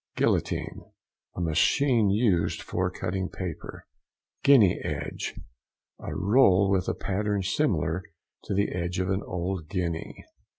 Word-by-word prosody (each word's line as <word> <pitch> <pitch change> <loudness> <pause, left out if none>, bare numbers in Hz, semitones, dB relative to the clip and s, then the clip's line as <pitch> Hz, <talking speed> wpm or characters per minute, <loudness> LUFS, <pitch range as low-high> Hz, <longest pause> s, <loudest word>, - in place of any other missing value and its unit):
GUILLOTINE.—A - - -3
machine 110 - +3
used 100 -5 +1
for 90 +1 -1
cutting 95 +1 -3
paper. 90 -5 -7 0.6
GUINEA 125 -10 +6
EDGE.—A - - -7
roll 100 -1 +4
with 95 -3 +1
a - - 0
pattern 100 0 -1
similar 90 -1 0 0.4
to - - -2
the 100 +1 +2
edge 90 0 -2
of 95 +1 0
an 95 +1 0
old 90 -2 -4
guinea. 85 -4 -4
95 Hz, 115 wpm, -27 LUFS, 90-100 Hz, 0.6 s, GUINEA